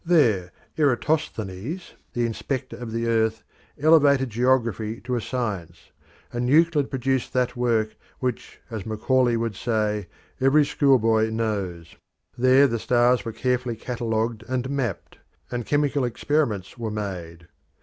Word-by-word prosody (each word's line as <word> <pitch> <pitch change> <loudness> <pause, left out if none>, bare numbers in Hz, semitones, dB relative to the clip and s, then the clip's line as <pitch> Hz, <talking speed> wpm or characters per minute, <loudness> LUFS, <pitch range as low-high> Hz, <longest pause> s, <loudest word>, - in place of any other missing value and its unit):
There 115 - +3 0.3
Eratosthenes, 140 - -1 0.2
the 120 -1 0
"Inspector 130 +3 -3
of 120 -2 -7
the 115 +1 -2
Earth," 110 -1 +1 0.4
elevated 140 -4 +5
geography 115 -2 +1
to 125 - -4
a 120 - -1
science, 95 -10 -4 0.4
and 120 +1 -1
Euclid 155 -1 +4
produced 130 -1 -1
that 125 -1 +1
work 115 -3 0 0.2
which, 125 -2 -4
as 110 -4 -4
Macaulay 120 +3 +1
would 115 -2 -2
say, 105 -3 -1 0.3
"every 140 +3 +4
schoolboy 115 -7 +3
knows." 100 -7 -3 0.4
There 130 +3 +5
the 115 -4 0
stars 120 -1 +3
were 115 - -4
carefully 125 +1 -1
catalogued 115 -1 -2
and 130 +1 -1
mapped, 135 -4 -3 0.3
and 120 -2 -3
chemical 145 -1 +1
experiments 120 -4 -1
were 115 -2 -2
made. 90 -5 -6
120 Hz, 130 wpm, -24 LUFS, 110-130 Hz, 0.4 s, elevated